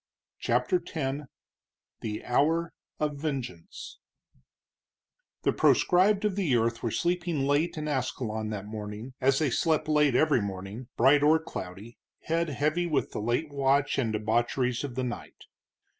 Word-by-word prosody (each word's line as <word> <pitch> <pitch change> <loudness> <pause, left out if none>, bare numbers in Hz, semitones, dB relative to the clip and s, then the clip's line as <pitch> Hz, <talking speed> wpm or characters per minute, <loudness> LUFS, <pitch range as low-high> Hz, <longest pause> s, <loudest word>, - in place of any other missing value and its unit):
CHAPTER 365 - +1
X 140 -2 -3 0.7
THE 105 -1 -5
HOUR 160 +7 +1 0.3
OF 150 -1 -1
VENGEANCE 135 - -5 1.4
The - - +2
proscribed 195 +3 +4
of 205 -3 +1
the 175 -11 +1
earth 115 0 +1
were 115 - -1
sleeping 175 - 0
late 145 +4 +1
in 155 0 -3
Ascalon 120 -6 -2
that 105 -2 -5
morning, 105 +3 -7
as 135 +1 +4
they 145 -3 +1
slept 160 +4 +1
late 150 -4 +3
every 150 -4 +4
morning, 100 +4 -6
bright 135 +4 +5
or 150 +2 +5
cloudy, 105 - -8 0.2
head 165 0 0
heavy 155 +5 0
with 150 -4 0
the - - -4
late 120 +8 -1
watch 140 +1 +2
and 115 -4 0
debaucheries 120 +4 0
of 135 -4 -5
the 130 - -1
night. 120 -1 -6
135 Hz, 145 wpm, -28 LUFS, 115-155 Hz, 1.4 s, bright